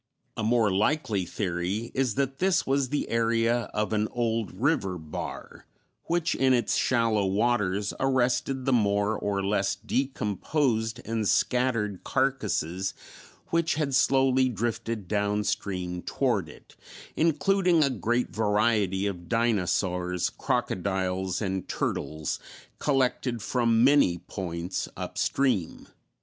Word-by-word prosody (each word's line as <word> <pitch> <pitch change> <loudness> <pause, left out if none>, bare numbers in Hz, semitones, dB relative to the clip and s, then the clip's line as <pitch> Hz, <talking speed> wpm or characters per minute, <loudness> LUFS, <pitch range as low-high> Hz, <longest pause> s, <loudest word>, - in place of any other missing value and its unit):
A - - -3
more 110 -1 +3
likely 105 - 0
theory 95 +5 -2
is 130 -5 0
that 135 0 -1
this 190 0 +2
was 135 -1 +1
the 145 - -1
area 115 0 +1
of 105 +1 -1
an 105 0 +1
old 115 -3 -1
river 100 - 0
bar, 80 -2 -7 0.4
which 170 -1 0
in 130 -1 +3
its 120 -3 0
shallow 115 -5 +2
waters 100 -1 +1
arrested 130 0 +1
the 135 - +2
more 105 -2 +2
or 100 -2 -2
less 100 -1 +1
decomposed 115 - -1
and 110 -2 -1
scattered 115 -6 +1
carcasses 95 - -1 0.5
which 165 -1 +1
had 145 -3 -1
slowly 130 -1 +3
drifted 115 -2 -3
down 105 +2 0
stream 90 -3 -3
toward - - 0
it, - - -16 0.4
including 175 +1 +3
a 140 - +2
great 120 +1 -1
variety 105 -2 +1
of 90 -4 -4
dinosaurs, 90 -6 0
crocodiles, 95 0 -1
and 95 -1 -2
turtles, 75 -1 -2 0.4
collected 130 -4 0
from 115 -1 +2
many 135 -10 +5
points 85 -1 -4
up - - -5
stream. 125 -11 0
110 Hz, 120 wpm, -27 LUFS, 95-130 Hz, 0.5 s, many